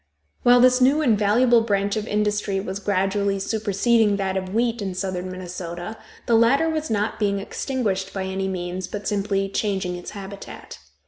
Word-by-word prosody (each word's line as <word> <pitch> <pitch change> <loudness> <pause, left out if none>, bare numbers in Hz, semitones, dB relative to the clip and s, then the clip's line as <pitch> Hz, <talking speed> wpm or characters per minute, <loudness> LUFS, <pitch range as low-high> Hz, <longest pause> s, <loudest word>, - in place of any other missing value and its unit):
While 245 0 +6
this 255 0 +5
new 280 +5 +4
and 235 -6 +4
valuable 230 +4 +4
branch 200 -2 0
of 215 0 -3
industry 210 -1 0
was 190 0 -4
gradually 200 0 0
superseding 215 +1 +1
that 190 -1 -2
of 185 -1 -3
wheat 230 +1 0
in 190 -2 -3
southern 185 -1 -3
Minnesota, 180 +1 -6 0.3
the 235 - +1
latter 235 +8 +4
was 315 -1 -2
not 215 0 -1
being 200 -2 +1
extinguished 200 -2 -2
by 195 - -3
any 190 0 -2
means, 180 0 -4
but 205 -1 -6
simply 195 -1 0
changing 195 -2 -2
its 175 - -8
habitat. 200 0 -9
200 Hz, 170 wpm, -23 LUFS, 190-225 Hz, 0.3 s, While